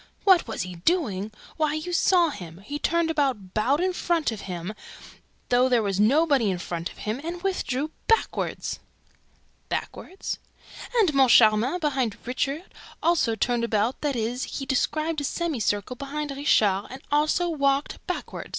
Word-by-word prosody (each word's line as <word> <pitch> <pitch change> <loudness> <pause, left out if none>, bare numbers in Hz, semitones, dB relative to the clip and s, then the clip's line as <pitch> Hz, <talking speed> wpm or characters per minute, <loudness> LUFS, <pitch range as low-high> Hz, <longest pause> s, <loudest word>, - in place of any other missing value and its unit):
"What 375 -7 +5
was 225 - -3
he 180 -1 -8
doing? 215 - 0 0.3
Why, 310 -1 +1
you 335 +3 -4
saw 345 -1 +4
him! 175 - -9
He 285 +9 -5
turned 335 +1 +1
about, 260 - -1
BOWED 265 +9 +2
IN 370 0 +1
FRONT 340 -6 0
OF 220 - -6
HIM, 180 +1 -5 0.8
THOUGH 250 +1 +4
THERE 240 -3 +3
WAS 195 -1 -1
NOBODY 270 +1 +4
IN 185 - -1
FRONT 170 -1 -4
OF - - -16
HIM, 220 +6 -3
AND 345 +2 -5
WITHDREW 310 -6 -1 0.2
BACKWARD." 450 - +1 1.1
"BACKWARD?" 380 - -5 0.8
"And 390 -9 +4
Moncharmin, 245 +2 +5
behind 265 - 0
Richard, 275 +7 -3 0.3
also 325 -10 +2
turned 235 +2 0
about; 225 +2 0
that 290 -3 0
is, 240 +2 -2
he 275 - -4
described 310 +4 0
a - - -4
semicircle 250 - -1
behind 290 +2 -4
Richard 210 -8 +2
and 260 +1 -9
also 305 +4 +2
WALKED 280 -2 0
BACKWARD! - - -5
270 Hz, 150 wpm, -25 LUFS, 220-315 Hz, 1.1 s, What